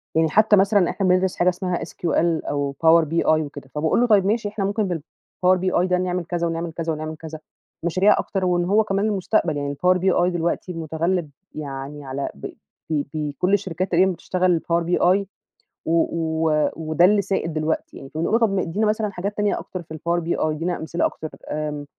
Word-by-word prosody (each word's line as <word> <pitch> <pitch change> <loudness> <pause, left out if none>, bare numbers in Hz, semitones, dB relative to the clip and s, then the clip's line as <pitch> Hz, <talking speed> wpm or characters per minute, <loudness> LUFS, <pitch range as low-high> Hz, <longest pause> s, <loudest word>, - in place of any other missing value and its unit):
يعني 160 0 +3
حتّى 215 +4 +5
مثلًا 195 -1 +3
إحنا 195 - -1
بندرس 185 0 +2
حاجة 175 - +3
اسمها 180 -1 -2
SQL 170 -1 -1
أو 140 -1 -2
Power 165 0 +6
BI 165 +2 -1
وكده 145 -3 0
فبقول 160 +8 +2
له 245 - +3
طيّب 205 -4 +4
ماشي، 215 +1 0
إحنا 205 -1 -3
ممكن 205 +2 0
نعمل 175 -4 -3
بالPower 185 +4 -1
BI 180 -1 +1 0.4
كذا 170 -1 0
ونعمل 165 0 -3
كذا 165 -1 -2
ونعمل 155 +1 -5
كذا 160 0 -9 0.4
مشاريع 185 +4 +3
أكتر، 190 -2 -2
وإن 175 -1 +1
هو 205 +4 +3
كمان 200 0 0
المستقبل 195 -6 0
يعني 145 0 -3
Power 185 0 +5
BI 180 -1 +2
دلوقتي 175 +2 -2
متغلب 165 +1 -2 0.3
يعني 140 0 -6
على 135 +1 -3
ب 70 - -6 0.4
ب 150 -3 0
بكل 155 +4 -1
الشركات 185 -2 -1
تقريبًا 185 +2 +4
بتشتغل 180 -1 0
Power 170 0 +3
BI 180 +3 +2 0.6
و - - -1 0.2
و 160 -2 +1
وده 160 +2 +2
اللي 205 +2 +4
سائد 190 -4 -2
دلوقتي 155 +1 -2
يعني، 135 - -10
فنقول 165 +10 0 0.4
له 220 - +3
مثلًا 215 -1 0
حاجات 200 +2 -4
تانية 210 -1 +1
أكتر 185 - -7
في 160 - -11
الPower 170 +2 -1
BI - - 0
ادينا 160 +3 -1
أمثلة 165 +2 -1
أكتر 155 - -4 0.2
آمم، 150 -1 -3
170 Hz, 185 wpm, -22 LUFS, 155-190 Hz, 0.6 s, Power